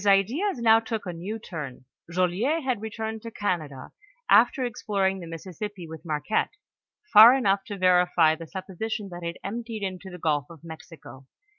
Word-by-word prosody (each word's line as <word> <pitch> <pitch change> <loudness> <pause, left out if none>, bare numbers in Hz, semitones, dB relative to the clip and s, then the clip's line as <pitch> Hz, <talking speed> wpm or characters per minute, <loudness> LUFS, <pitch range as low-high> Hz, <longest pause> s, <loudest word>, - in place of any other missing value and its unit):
ideas 240 - +2
now 225 -1 +5
took 225 -2 -4
a 180 - -4
new 185 +7 -5
turn, 150 - -8 0.2
Joliet 185 - 0
had 255 -5 -1
returned 220 0 -5
to 230 - -7
Oanado, 160 -11 -3 0.4
after 265 - +5
exploring 195 -4 -1
the 170 - -8
Mississippi 180 +3 -7
with 160 0 -10
Marquette, 160 - -1 0.6
fur 225 +4 +10
enough 200 -7 +1
to 205 -2 -6
Terify 180 -3 +4
the 165 +1 -8
supposition 195 +4 -5
that 175 -1 -8
it 170 0 -5
emptied 225 +1 -5
into 190 0 -5
the 180 - -9
gulf 150 -4 0
of 165 -2 -14
Mexico. 160 -5 -12
190 Hz, 160 wpm, -26 LUFS, 170-220 Hz, 0.6 s, fur